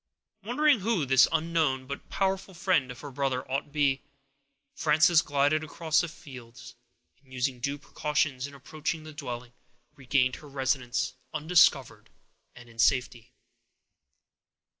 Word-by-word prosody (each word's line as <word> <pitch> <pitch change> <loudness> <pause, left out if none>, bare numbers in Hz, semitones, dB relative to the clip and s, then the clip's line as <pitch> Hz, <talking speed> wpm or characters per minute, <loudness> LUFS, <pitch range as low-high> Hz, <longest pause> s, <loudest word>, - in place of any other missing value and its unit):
Wondering 265 +5 +2
who 200 -6 0
this 130 0 +5
unknown 160 -5 0
but 140 +1 -8
powerful 190 -1 -1
friend 170 -7 +1
of 125 0 -9
her 145 - -8
brother 130 -1 -1
could 135 +2 -4
be, 140 -2 +1 0.7
Frances 155 +2 +4
glided 145 +2 +1
across 160 +1 0
the 175 - -3
fields, 125 -6 -12 0.5
and 130 - -25
using 125 0 -2
due 140 +3 -2
precautions 145 -2 -2
in 140 - -13
approaching 155 +4 -4
the 155 0 -10
dwelling, 125 -4 -7 0.4
regained 130 -1 +1
her 150 - -13
residence 130 -2 -1 0.2
undiscovered 155 -5 +3 0.5
and 120 0 -13
in 115 0 -17
safety. 125 -1 +1
140 Hz, 130 wpm, -28 LUFS, 130-155 Hz, 0.7 s, this